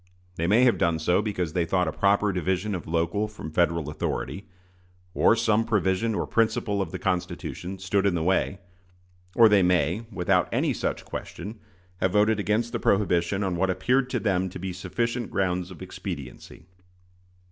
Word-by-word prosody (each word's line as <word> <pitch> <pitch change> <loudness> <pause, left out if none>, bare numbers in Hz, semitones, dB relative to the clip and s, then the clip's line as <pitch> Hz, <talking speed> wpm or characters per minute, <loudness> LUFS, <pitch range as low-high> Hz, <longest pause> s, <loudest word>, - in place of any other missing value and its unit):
They 85 +1 -1
may 110 +6 +5
have 125 -2 +4
done 85 -1 +2
so 90 +5 +2
because 90 -7 -3
they 85 - +1
thought 90 +1 +1
a - - 0
proper 100 +2 +2
division 95 +3 -1
of 90 - -5
local 85 +6 0
from 105 -7 -8
Federal 85 -2 +1
authority, 95 +6 -4 0.7
or - - +4
some 115 -1 +2
provision 105 0 0
or - - -1
principle 110 -3 +1
of 95 - -3
the - - -5
Constitution, 90 0 -3
stood 95 +1 0
in 95 - +1
the 80 - -1
way; 95 +2 +1 0.8
or 115 - +8
they 105 -2 +5
may, 90 +4 +1
without 90 -3 +1
any - - +1
such - - -3
question, 105 +6 -7 0.4
have 95 0 0
voted 105 +1 +3
against 110 +3 0
the - - -2
prohibition 95 -1 +1
on 95 -2 -1
what 95 +2 +1
appeared 125 +8 +1
to - - -1
them 95 -3 0
to - - -8
be 95 0 -5
sufficient 115 +5 -2
grounds 90 -1 -1
of 90 -4 -10
expediency. 65 -3 -8
95 Hz, 175 wpm, -26 LUFS, 90-105 Hz, 0.8 s, or